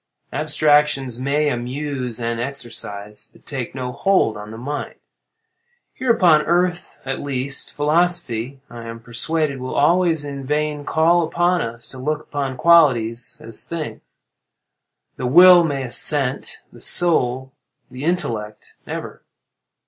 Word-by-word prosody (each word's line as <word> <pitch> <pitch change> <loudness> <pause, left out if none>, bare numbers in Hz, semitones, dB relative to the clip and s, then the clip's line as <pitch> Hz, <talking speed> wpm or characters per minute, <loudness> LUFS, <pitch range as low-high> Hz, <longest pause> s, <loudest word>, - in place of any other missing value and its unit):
Abstractions 150 -4 +2
may 145 +3 +1
amuse 125 -1 -4
and 115 0 -2
exercise, 115 -5 -5
but - - -23
take 130 -3 -5
no 125 -1 -4
hold 185 - +1
on 105 0 -9
the 110 - -9
mind. 145 +5 -5 1.0
Here 260 - -4
upon 175 -9 +5
earth, 175 +1 -1
at 135 0 -3
least, 140 0 -3
philosophy, 145 -5 0
I 115 -1 -10
am 115 0 -8
persuaded, 140 +5 -1
will 130 0 -5
always 165 0 +2
in 140 -1 -6
vain 150 +1 -2
call 165 +3 +3
upon 175 +2 +1
us 115 +1 -5
to 130 - -10
look 150 +3 -2
upon 135 -4 -4
qualities 125 -8 +3
as 115 -1 -2
things. 165 -2 -5 1.2
The 125 - -2
will 175 +5 +8
may 140 -4 -2
assent—the 135 +1 0
soul—the 130 -4 0
intellect, 115 -11 -3
never. - - -7
140 Hz, 125 wpm, -20 LUFS, 125-160 Hz, 1.2 s, will